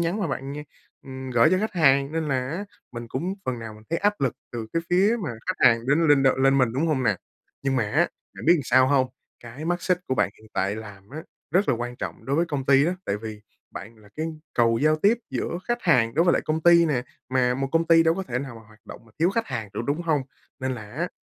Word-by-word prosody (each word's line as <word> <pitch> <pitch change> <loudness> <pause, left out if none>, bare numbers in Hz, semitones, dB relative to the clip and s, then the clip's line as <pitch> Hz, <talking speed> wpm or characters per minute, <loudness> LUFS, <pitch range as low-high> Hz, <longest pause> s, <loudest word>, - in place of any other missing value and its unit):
nhắn 170 +5 -1
mà 190 - 0
bạn 135 -1 -4
như 150 +1 -6 0.4
ừm, 130 -1 -8
gởi 120 +4 +4
cho 185 - +3
khách 215 +2 -2
hàng. 140 -4 +3
Nên 160 -2 -2
là 130 -2 -1
á, 180 +7 -4 0.3
mình 120 -1 -7
cũng 175 +11 -3
phần 125 -2 -2
nào 110 -1 -8
mình 110 - -15
thấy 165 - 0
áp 205 -2 0
lực 135 -3 0 0.2
từ 115 -2 -5
cái 165 - 0
phía 195 +6 +4
mà 150 - -2
khách - - +2
hàng 115 0 +3
đến 155 +3 +3
lên 145 -2 +5
đ - - +3
lên 135 +1 +4
mình, 125 -3 +2
đúng 145 +6 0
hông 150 -5 +1
nè? 110 -5 +2 0.5
Nhưng 135 -1 0
mà 115 - +2
á, 165 +5 +3 0.3
bạn - - -9
biết 170 -2 +5
sao 130 +1 +4
hông? 135 -2 +3 0.4
Cái 120 +6 -9
mắt 175 +1 -1
xích 180 -2 +1
của 130 - 0
bạn 90 - +1
hiện 110 - -18
tại 100 +3 -1
làm 105 -2 -10
á, 155 +3 -7 0.3
rất 195 +3 +2
là - - +4
quan 120 +1 -5
trọng - - -6
đối 140 +2 -1
với 170 - +3
công 140 -4 -3
ty 140 0 +5
á, 180 - 0
tại 100 - 0
vì 105 0 -8 0.3
bạn 110 +3 -9
là 105 -1 -18
cái 160 +1 -2 0.3
cầu 115 -1 +3
giao 155 +1 +3
tiếp 210 +8 +3
giữa 170 - -3
khách 240 0 -2
hàng 125 -9 +3
đối 165 - +3
với 175 - +4
lại - - +1
công 155 +1 -1
ty 170 0 +6
nè. 130 -6 0 0.3
Mà 125 -1 +2
một 135 +1 -2
công 165 0 +2
ty 165 -1 +6
đâu 165 0 +3
có 190 - -3
thể 125 -7 -3
nào 130 -2 -6
mà 115 - -12
hoạt 110 0 -19
động - - -11
mà 115 - -22
thiếu 170 +3 +3
khách 230 +3 -1
hàng 115 -6 -4
được, - - -2
đúng 145 +4 -1
hông? 155 -5 +1 0.4
Nên 130 0 -1
là 105 -4 -9
á, - - -2
135 Hz, 275 wpm, -25 LUFS, 120-165 Hz, 0.5 s, ty